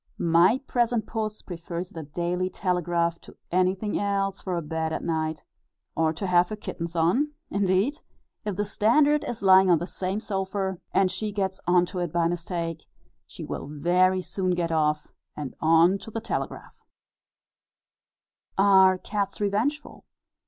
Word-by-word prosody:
My 170 Hz, +7 st, +4 dB
present 240 Hz, -3 st, +1 dB
puss 215 Hz, -2 st, -4 dB
prefers 170 Hz, 0 st, -6 dB
the 165 Hz, -, -7 dB
Daily 175 Hz, +4 st, -2 dB
Telegraph 175 Hz, -2 st, -1 dB
to -, -, -15 dB
anything 185 Hz, +3 st, +1 dB
else 195 Hz, -1 st, -1 dB
for 180 Hz, -2 st, -2 dB
a -, -, -1 dB
bed 160 Hz, +1 st, -2 dB
at -, -, -3 dB
night, 160 Hz, -2 st, -2 dB, 0.5 s
or 160 Hz, -1 st, +2 dB
to 165 Hz, +5 st, -5 dB
have 180 Hz, -1 st, +3 dB
her 215 Hz, -, -3 dB
kittens 170 Hz, -4 st, -6 dB
on; 195 Hz, -, +2 dB, 0.2 s
indeed, 200 Hz, +9 st, +1 dB, 0.4 s
if 210 Hz, -3 st, -3 dB
the 205 Hz, +2 st, -1 dB
Standard 285 Hz, +9 st, +3 dB
is 225 Hz, -4 st, -5 dB
lying 190 Hz, 0 st, +7 dB
on 175 Hz, -, +6 dB
the 170 Hz, -, -3 dB
same 190 Hz, +2 st, -3 dB
sofa, 190 Hz, -2 st, -3 dB
and 190 Hz, -1 st, +3 dB
she 210 Hz, +3 st, -2 dB
gets 190 Hz, -2 st, -2 dB
on 175 Hz, 0 st, +4 dB
to 180 Hz, +1 st, -6 dB
it 175 Hz, -3 st, -2 dB
by 170 Hz, 0 st, +2 dB
mistake, 170 Hz, -1 st, -4 dB, 0.4 s
she -, -, -9 dB
will -, -, -5 dB
very 180 Hz, +5 st, +2 dB
soon 185 Hz, -1 st, -1 dB
get 170 Hz, -1 st, -1 dB
off, 150 Hz, -1 st, 0 dB, 0.2 s
and 145 Hz, -4 st, -5 dB
on 165 Hz, +4 st, +4 dB
to -, -, -9 dB
the 225 Hz, -, -4 dB
Telegraph. -, -, -5 dB, 1.8 s
Are 190 Hz, -1 st, +6 dB
cats 200 Hz, 0 st, -3 dB
revengeful? 215 Hz, +9 st, -2 dB
185 Hz, 155 wpm, -26 LUFS, 170-200 Hz, 1.8 s, lying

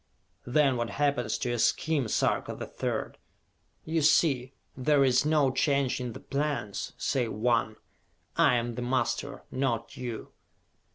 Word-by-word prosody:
Then 135 Hz, 0 st, +3 dB
what 120 Hz, -1 st, -2 dB
happens 140 Hz, -6 st, 0 dB
to 125 Hz, -, -2 dB
your 120 Hz, -1 st, -1 dB
scheme, 150 Hz, +1 st, +1 dB
Sarka -, -, 0 dB
the -, -, -6 dB
Third? -, -, -4 dB, 0.7 s
You 160 Hz, 0 st, 0 dB
see, 135 Hz, -4 st, +3 dB, 0.2 s
there 140 Hz, +2 st, +3 dB
is 130 Hz, +2 st, +3 dB
no 150 Hz, -4 st, +3 dB
change 135 Hz, -1 st, +1 dB
in 125 Hz, -2 st, -4 dB
the -, -, -8 dB
plans, 140 Hz, -8 st, -3 dB
save 125 Hz, -4 st, -1 dB
one: 115 Hz, 0 st, +1 dB, 0.6 s
I -, -, +4 dB
am 120 Hz, 0 st, -1 dB
the 125 Hz, -, -5 dB
master, 130 Hz, +2 st, -1 dB
not 120 Hz, -4 st, -2 dB
you!" 120 Hz, -3 st, -6 dB
130 Hz, 140 wpm, -28 LUFS, 120-140 Hz, 0.7 s, I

